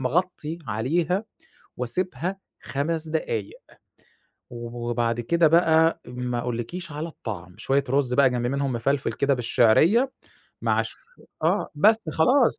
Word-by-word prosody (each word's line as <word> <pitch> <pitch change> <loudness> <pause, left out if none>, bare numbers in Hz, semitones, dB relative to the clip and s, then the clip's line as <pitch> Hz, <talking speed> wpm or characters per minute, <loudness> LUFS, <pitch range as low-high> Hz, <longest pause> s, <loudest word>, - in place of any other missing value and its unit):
مغطّي 165 +3 -1
عليها 170 - 0 0.5
واسيبها 170 +7 -2 0.2
5 160 +3 -2
دقايق، 115 -10 -3 0.9
وبعد 120 0 -2
كده 165 +7 +3
بقى 165 0 +4
ما 125 0 -3
أقولكيش 125 +9 -4
على 150 +3 -4
الطعم، 95 - -8
شوية 135 +4 +1
رز 135 -2 +1
بقى 135 0 +5
جنب 120 -1 -1
منهم 140 +1 -1
مفلْفل 125 +1 0
كده 140 +4 +1
بالشِعرية 145 - +3 0.5
مع - - +2
شو - - -8 0.5
آه - - +1
بس 215 +9 +5
خلاص 250 - +3
140 Hz, 120 wpm, -25 LUFS, 120-165 Hz, 0.9 s, بقى